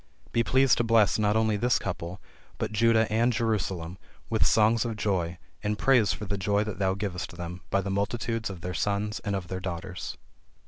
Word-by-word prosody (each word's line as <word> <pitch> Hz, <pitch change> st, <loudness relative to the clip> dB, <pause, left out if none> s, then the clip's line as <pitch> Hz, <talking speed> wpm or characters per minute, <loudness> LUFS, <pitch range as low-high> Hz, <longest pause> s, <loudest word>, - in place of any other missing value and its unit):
Be 115 Hz, -, +2 dB
pleased 130 Hz, +2 st, +4 dB
to -, -, +3 dB
bless 115 Hz, -3 st, +4 dB
not 105 Hz, 0 st, +2 dB
only 110 Hz, -1 st, +2 dB
this 120 Hz, +2 st, +2 dB
couple, 90 Hz, 0 st, -5 dB, 0.4 s
but -, -, -2 dB
Judah 115 Hz, +1 st, +4 dB
and 115 Hz, +3 st, +3 dB
Jerusalem, 95 Hz, -7 st, -2 dB, 0.3 s
with -, -, +3 dB
songs 110 Hz, +1 st, +4 dB
of 115 Hz, -2 st, -3 dB
joy, 90 Hz, -5 st, -1 dB, 0.2 s
and 105 Hz, 0 st, -1 dB
praise 125 Hz, -6 st, +4 dB
for 105 Hz, -, -4 dB
the 100 Hz, 0 st, -3 dB
joy 100 Hz, +2 st, +1 dB
that 105 Hz, -2 st, -6 dB
thou 95 Hz, -1 st, +1 dB
givest 95 Hz, -3 st, -4 dB
them, 90 Hz, +1 st, -6 dB
by 100 Hz, -, +2 dB
the 100 Hz, 0 st, -3 dB
multitudes 110 Hz, +3 st, -1 dB
of 95 Hz, -3 st, -8 dB
their 90 Hz, 0 st, -4 dB
sons 105 Hz, +4 st, -1 dB
and 100 Hz, -1 st, -2 dB
of 95 Hz, -2 st, -4 dB
their 95 Hz, +1 st, -4 dB
daughters." 90 Hz, -1 st, -5 dB
105 Hz, 195 wpm, -27 LUFS, 95-110 Hz, 0.4 s, pleased